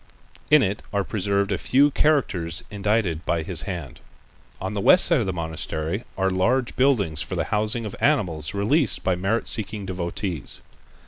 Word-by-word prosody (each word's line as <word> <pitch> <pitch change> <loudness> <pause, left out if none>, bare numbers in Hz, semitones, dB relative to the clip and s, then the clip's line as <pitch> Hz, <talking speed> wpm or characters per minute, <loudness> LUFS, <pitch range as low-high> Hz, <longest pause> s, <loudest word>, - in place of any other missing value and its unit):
In 150 -2 +6
it 100 +2 -1
are 100 -2 0
preserved 100 0 -1
a 95 - 0
few 140 +3 +3
characters 95 - +1
indited 100 -5 0
by 85 -2 -1
his 85 -2 -1
hand. 85 -9 -6 0.6
On 95 +2 -4
the 100 - -2
west 180 - +6
side 170 - +4
of 110 - -1
the - - 0
monastery 80 - -3
are 95 0 +1
large 120 +7 +1
buildings 105 - +2
for - - -4
the - - 0
housing 110 +2 +1
of 105 - -6
animals 90 - 0
released 130 +9 +1
by 95 - +2
merit 95 +6 -1
seeking 105 -1 -3
devotees. 90 -3 -3
100 Hz, 170 wpm, -24 LUFS, 85-115 Hz, 0.6 s, In